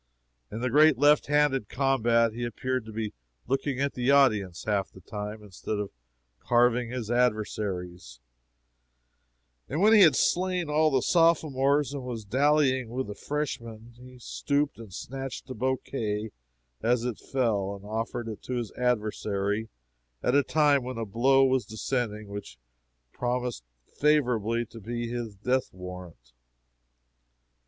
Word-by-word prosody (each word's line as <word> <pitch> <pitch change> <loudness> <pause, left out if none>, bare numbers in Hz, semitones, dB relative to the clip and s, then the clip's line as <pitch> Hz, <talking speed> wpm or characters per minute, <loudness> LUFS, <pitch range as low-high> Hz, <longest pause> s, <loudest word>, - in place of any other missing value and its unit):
In 110 - -5
the 125 -1 -1
great 150 0 +6
left 145 +3 +4
handed 145 -6 +2
combat 115 -4 +2
he 120 +2 -5
appeared 130 +1 -2
to - - -7
be 110 -1 -4 0.3
looking 135 +1 -1
at 140 0 0
the 125 +1 -1
audience 110 -11 +3
half 100 -3 0
the - - -14
time, 105 +3 -6
instead 105 +1 -5
of 105 -1 -4 0.5
carving 120 0 +2
his 120 -2 -4
adversaries; 100 - -1 1.5
and 150 - -2
when 215 +4 +6
he 215 - +8
had 160 -5 +7
slain 180 -3 +1
all 155 +1 +4
the 130 -4 +1
sophomores 150 -4 +3
and 140 - -4
was 120 -4 -6
dallying 130 +1 +2
with 130 +3 -3
the 105 - -6
freshman, 115 -4 -5
he 125 0 -13
stooped 140 +2 -1
and 110 -4 -10
snatched 135 +5 -6
a - - -2
bouquet 110 -4 -2 0.5
as 120 +1 +1
it 125 -3 -3
fell, 105 -7 -1
and 100 0 -12
offered 115 +2 -3
it 110 -2 -6
to 130 - -6
his 120 -3 -3
adversary 110 -3 -1 0.5
at 125 - +2
a 145 - +6
time 145 -1 +3
when 125 -1 -5
a 115 - -2
blow 135 +6 +4
was 130 -1 +2
descending 110 -1 -3
which 100 -11 -8 0.6
promised 125 - -2 0.2
favorably 120 -6 +1
to 115 - -12
be 120 +2 -4
his 115 -3 -5
death 125 +6 0
warrant. 90 -9 -10
120 Hz, 145 wpm, -27 LUFS, 110-135 Hz, 1.5 s, he